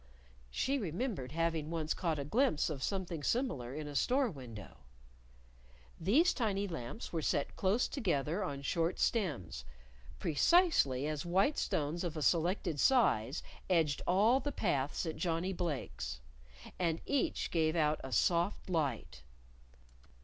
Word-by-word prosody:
(She 275 - 0
remembered 180 - -3
having 165 -1 -1
once 160 -2 -1
caught 165 -3 -1
a 140 - -3
glimpse 220 - +2
of 140 -3 -5
something 180 -2 -2
similar 145 - -1
in 150 -1 -5
a 145 - -6
store 255 - +2
window.) 120 - -10 1.2
These 265 - +4
tiny 205 -5 -1
lamps 165 - -6
were 165 - -1
set 145 -1 -1
close 200 +6 +2
together 175 - -1
on 140 -6 -4
short 165 +4 0
stems, 155 - -1 0.5
precisely 160 - +3
as 150 -1 -2
white 190 - +2
stones 155 +4 -1
of 165 -2 -3
a 155 - -2
selected 170 -1 +1
size 145 - +3 0.3
edged 160 -6 +2
all 215 +8 +4
the 290 - -3
paths 145 - -1
at 160 - -4
Johnnie 175 +1 -1
Blake's. 165 - -4 0.6
And 165 -2 +1
each 280 -2 0
gave 160 -1 +2
out 155 -2 +1
a 130 - -6
soft 170 - +1
light. 140 - -2
165 Hz, 135 wpm, -34 LUFS, 145-200 Hz, 1.2 s, These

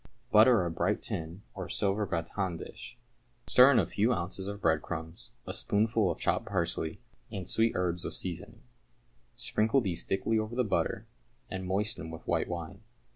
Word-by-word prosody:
= - - -38
Butter 110 -2 +6
a 85 - -2
bright 85 - 0
tin 85 +5 -4
or - - -6
silver 100 +1 0
gratin 85 +1 -2
dish. 120 - -9 0.5
Stir 125 +2 +7
into 140 - +5
a - - -2
few 110 +5 +1
ounces 95 +1 -3
of 100 0 -5
breadcrumbs 85 +5 -2
a 95 - -4
spoonful 110 0 +2
of 85 - -2
chopped 115 - 0
parsley 85 -5 -1 0.3
and 95 -5 -5
sweet 115 +1 +3
herbs 90 -1 0
with - - -4
seasoning. 100 +6 -4 0.7
Sprinkle 115 +1 +2
these 90 -8 -1
thickly 110 +3 0
over 110 +2 -3
the 125 - +2
butter, 105 - -1 0.5
and 95 0 -4
moisten 100 -3 -1
with 80 -1 -9
white - - +1
wine. 85 +3 -6
95 Hz, 170 wpm, -30 LUFS, 85-110 Hz, 0.7 s, Stir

